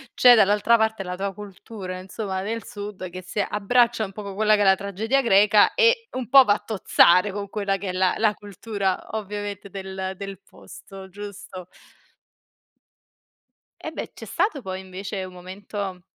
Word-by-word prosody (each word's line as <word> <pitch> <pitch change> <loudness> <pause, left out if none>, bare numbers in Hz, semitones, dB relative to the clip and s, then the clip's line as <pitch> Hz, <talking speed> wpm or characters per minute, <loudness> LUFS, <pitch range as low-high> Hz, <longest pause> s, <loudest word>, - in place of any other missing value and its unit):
c'è 250 -1 +8
dall'altra 210 +2 +4
parte 220 -2 0
la 180 0 -5
tua 195 +1 -3
cultura, 195 -1 -8
insomma, 190 0 -5
del 225 +2 -4
sud 205 -3 -7
che 185 +1 -8
si 185 +3 -6
abbraccia 220 +3 +1
un 195 - -9
poco 200 -1 -7
quella 215 +1 +3
che 205 - 0
è - - +4
la 190 -1 +6
tragedia 205 +7 -1
greca 210 -2 +5
e 465 -1 +3
un 255 -2 -5
po' 270 0 +9
va 205 - +4
a 210 0 -5
tozzare 190 -2 +4
con 200 0 -6
quella 200 -2 -1
che 195 - -5
è - - -1
la 185 0 +1
la 215 -1 +2
cultura, 205 -1 -3 0.2
ovviamente, 205 -1 -6
del 190 0 -5
del 195 -2 -7
posto, 195 -1 -13
giusto. 195 -2 -9 2.2
Eh - - -6
beh, - - -6
c'è - - -10
stato 395 -10 -1
poi 190 -3 -5
invece 190 +1 -6
un 185 - -11
momento, 190 +1 -7
200 Hz, 170 wpm, -24 LUFS, 190-215 Hz, 2.2 s, po